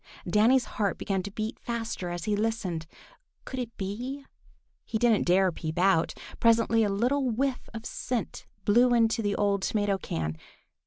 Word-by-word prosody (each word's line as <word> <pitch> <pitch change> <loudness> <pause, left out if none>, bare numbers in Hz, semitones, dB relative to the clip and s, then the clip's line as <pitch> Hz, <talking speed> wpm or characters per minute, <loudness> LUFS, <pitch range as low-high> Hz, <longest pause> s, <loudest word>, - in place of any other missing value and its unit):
Danny's 225 +7 +4
heart 205 -3 -1
began 195 -2 -1
to 195 - -6
beat 215 +2 -4
faster 230 -6 -4
as 175 -1 -4
he 210 +2 +1
listened. 205 -7 -2 0.6
Could 260 - -5
it 235 -2 -5
be? 245 +8 -4 0.6
He 220 - -2
didn't 230 -4 +3
dare 185 +1 +4
peep 160 -1 -5
out. 175 -3 +3 0.2
Presently 230 0 +4
a 210 - +1
little 250 +7 +1
whiff 255 +3 -1
of 225 0 -8
scent 245 -3 -4 0.2
blew 240 +4 +5
into 225 0 +3
the 205 -2 0
old 200 -1 +1
tomato 205 -1 0
can. 80 - -3
215 Hz, 160 wpm, -28 LUFS, 195-235 Hz, 0.6 s, blew